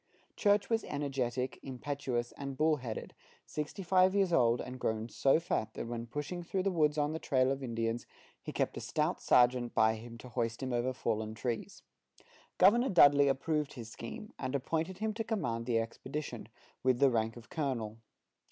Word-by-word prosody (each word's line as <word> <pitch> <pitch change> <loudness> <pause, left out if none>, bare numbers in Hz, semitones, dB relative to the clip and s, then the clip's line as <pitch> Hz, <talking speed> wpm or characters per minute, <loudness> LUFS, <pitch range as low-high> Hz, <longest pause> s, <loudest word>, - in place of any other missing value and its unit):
Church 205 -1 +3
was 225 -1 +1
energetic, 130 -3 -2
impetuous, 130 -2 -3
and 140 -1 -6
bull 155 0 +3
headed, 120 -5 -6 0.3
sixty 150 +6 -5
five 185 +1 +4
years 195 -3 +2
old, 120 -6 +4
and 125 0 -6
grown 110 0 -1
so 135 +5 +3
fat 110 -10 -2
that - - -4
when 115 0 -5
pushing 145 +8 -4
through 185 +2 -2
the 195 - +1
woods 155 -3 +2
on 150 +1 +1
the 160 - -3
trail 130 -4 +2
of 135 0 -2
Indians, 115 -2 -2 0.3
he - - -6
kept - - -1
a - - -4
stout - - -1
sergeant 125 -1 +3
by 110 0 +5
him 115 +1 -9
to 125 - -11
hoist 115 +1 -2
him 130 -1 -2
over 120 +2 +1
fallen 110 -3 -2
trees. 115 0 -4 0.7
Governor 235 +7 +5
Dudley 145 -5 +7
approved 150 +2 0
his 115 -3 -8
scheme, 115 - -8
and 130 - -2
appointed 160 +6 -1
him 215 +1 -1
to 225 +1 -3
command 125 - -2
the 120 -2 +2
expedition, 120 +2 -4 0.3
with 130 -1 +3
the 135 0 +5
rank 115 0 0
of 115 -1 -13
colonel. 120 -8 -2
130 Hz, 180 wpm, -33 LUFS, 115-155 Hz, 0.7 s, Dudley